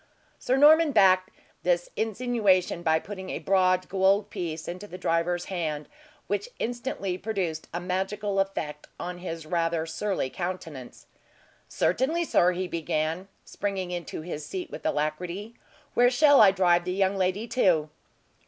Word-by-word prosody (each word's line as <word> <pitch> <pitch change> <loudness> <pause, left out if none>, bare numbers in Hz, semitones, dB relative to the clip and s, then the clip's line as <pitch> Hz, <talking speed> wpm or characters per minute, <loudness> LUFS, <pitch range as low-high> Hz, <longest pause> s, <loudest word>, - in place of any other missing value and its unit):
Sir 255 - +1
Norman 305 +1 +6
backed 185 -3 +5 0.3
this 175 0 0
insinuation 215 -6 +1
by 160 -2 +3
putting 190 +1 -7
a - - -3
broad 185 -1 +2
gold 195 +2 +2
piece 165 -5 -4
into 185 +4 -6
the 180 - -8
driver's 175 +1 0
hand, 155 -5 -3 0.4
which 205 0 -2
instantly 230 -6 -3
produced 185 -8 -3
a 175 - -3
magical 195 +3 -2
effect 150 -6 -3
on 175 0 -5
his 165 -3 -6
rather 165 -1 0
surly 165 -3 -2
countenance. 165 -8 -6 0.6
"Certainly, 295 - +1
sir," 180 - +3
he 185 +1 -3
began, 165 +2 -2 0.2
springing 190 -3 -3
into 175 -3 -5
his 155 -2 -6
seat 180 +5 -6
with - - -4
alacrity. 175 +8 -2 0.4
"Where 245 0 +5
shall 285 +2 +6
I 205 - +9
drive 180 -2 +3
the 180 +1 -2
young 195 0 +1
lady 190 +4 0
to?" 165 -11 +2
185 Hz, 145 wpm, -27 LUFS, 170-205 Hz, 0.6 s, I